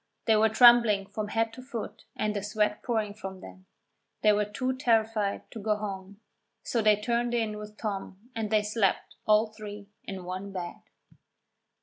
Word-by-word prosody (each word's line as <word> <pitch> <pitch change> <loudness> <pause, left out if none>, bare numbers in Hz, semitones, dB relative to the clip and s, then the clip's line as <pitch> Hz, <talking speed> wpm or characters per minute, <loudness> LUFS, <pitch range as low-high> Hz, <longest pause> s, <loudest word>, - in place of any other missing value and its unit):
They 220 - +5
were 220 +1 +4
trembling 230 -3 +6
from 210 +1 -4
head 225 +1 0
to 255 - -9
foot 250 -4 -7
and 215 0 -1
the 205 - -1
sweat 210 0 0
pouring 220 -4 -1
from 190 -3 -8
them. 95 - -13 0.6
They 210 -1 +6
were 210 0 +2
too 255 +6 -2
terrified 225 -5 +1
to 225 - -7
go 210 +1 +1
home, 200 -1 -6 0.4
so 235 - 0
they 215 -1 +5
turned 240 +2 0
in 215 -2 -1
with 210 0 -10
Tom 205 +2 -5
and 220 -2 -2
they 215 -1 +3
slept, 210 -2 0
all 215 +1 +4
three, 210 -1 -9
in 190 -2 -6
one 185 +2 -5
bed. 180 -2 -6
210 Hz, 175 wpm, -28 LUFS, 200-225 Hz, 0.6 s, trembling